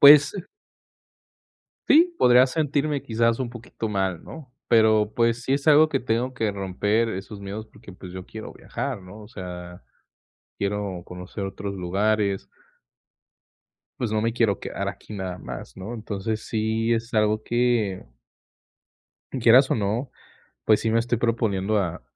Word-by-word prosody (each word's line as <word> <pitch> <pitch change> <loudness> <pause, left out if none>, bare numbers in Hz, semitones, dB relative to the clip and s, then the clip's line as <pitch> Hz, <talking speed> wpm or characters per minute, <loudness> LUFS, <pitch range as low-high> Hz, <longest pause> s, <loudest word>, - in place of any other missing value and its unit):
pues 145 +2 +9 1.5
sí, 340 +4 +5
podría 125 +1 +6
sentirme 145 0 0
quizás 115 -2 +1
un 130 -2 -2
poquito 120 -1 -6
mal, 95 -4 -1
¿no? 145 -6 -11 0.2
Pero, 110 -2 +4
pues, 115 +1 +2
sí 130 - +1
es 140 +2 -1
algo 155 +1 +7
que 135 - 0
tengo 125 +1 -1
que 110 -4 -1
romper 105 +4 0
esos 100 0 -6
miedos, 100 +3 -6
porque, 100 - -14
pues, 90 0 -10
yo 95 -1 -7
quiero 110 0 -9
viajar, 120 -3 -5
¿no? 95 +4 -12
O 105 - -12
sea, 90 - -8 0.7
quiero 100 -3 -2
conocer 90 +3 -6
otros 100 +1 -5
lugares 100 -1 0 1.5
pues, 120 -4 -1
no 110 0 +1
me 115 +1 0
quiero 115 -5 +2
quedar - - -4
aquí - - -7
nada 95 -3 -4
más, - - -8
¿no? 95 +5 -6
Entonces, 110 -1 -4
sí 110 +1 0
es 115 +1 -3
algo 110 0 +2
que 120 -6 +1 1.4
quieras, 125 +4 +6
o, - - +3
no, 110 +5 -1 0.5
pues, 110 -1 +4
sí 115 - 0
me 115 - +3
estoy 115 0 0
proponiendo 110 -3 +1
a 85 -5 -2
110 Hz, 150 wpm, -24 LUFS, 100-120 Hz, 1.5 s, pues